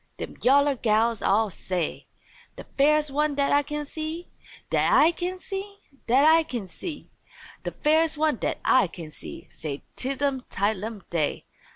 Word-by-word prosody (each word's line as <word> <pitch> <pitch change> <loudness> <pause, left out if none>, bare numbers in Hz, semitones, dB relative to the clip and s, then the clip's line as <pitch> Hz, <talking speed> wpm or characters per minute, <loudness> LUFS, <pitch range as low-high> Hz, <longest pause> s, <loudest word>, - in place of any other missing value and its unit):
dem - - -6
yaller 280 +2 +5
gals 225 -1 +1
all 210 +1 +2
say. 180 -2 -3 0.5
"De - - -9
fairest 300 +1 +3
one 300 +1 +1
dat 280 0 +1
I 285 - +5
can 295 +1 -4
see, 315 +4 -5 0.4
dat - - +2
I 320 - +6
can 360 +2 -4
see, 395 +2 -6 0.3
dat 260 +5 +5
I 320 +1 +7
can 245 -11 -5
see, 295 - -7 0.6
De - - -2
fairest 315 +1 +2
one 305 -4 +2
dat - - -2
I 260 -6 +5
can 165 -2 -9
see," - - -9
said 145 -3 -6
Tidlum 270 0 -1
Tidelum 210 0 -2
Day. 160 -4 -1
280 Hz, 160 wpm, -26 LUFS, 215-310 Hz, 0.6 s, I